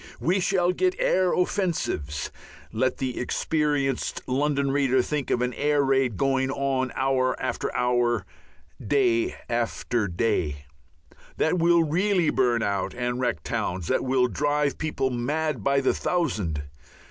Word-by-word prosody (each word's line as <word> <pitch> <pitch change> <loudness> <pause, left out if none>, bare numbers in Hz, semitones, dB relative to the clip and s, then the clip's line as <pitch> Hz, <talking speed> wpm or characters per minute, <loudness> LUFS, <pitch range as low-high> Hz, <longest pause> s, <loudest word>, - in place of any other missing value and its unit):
We 180 +4 +1
shall 180 -1 +2
get 370 - +1
air 185 - +2
offensives 170 - -1 0.4
let 130 +4 0
the 130 -2 -3
experienced 145 0 -1
London 140 +1 0
reader 135 -2 +2
think 150 -1 -3
of 125 - +1
an 125 0 -1
air 145 +1 +1
raid 135 -5 +1
going 135 -1 +1
on 135 -2 -1
hour 130 -1 +1
after - - -2
hour, 120 -1 +1 0.6
day 360 -3 +2
after 120 -1 -1
day 85 -7 -1 0.7
that 175 +3 +1
will 170 0 +4
really 175 +2 +1
burn 120 -3 +2
out 100 -2 -1
and 125 0 -2
wreck 120 - -1
towns, 90 -2 -3
that - - +1
will 130 -1 +2
drive 145 +1 0
people 150 -4 -1
mad 140 +1 -1
by 140 0 +2
the 130 - +2
thousand. 100 - -1
135 Hz, 135 wpm, -25 LUFS, 120-155 Hz, 0.7 s, will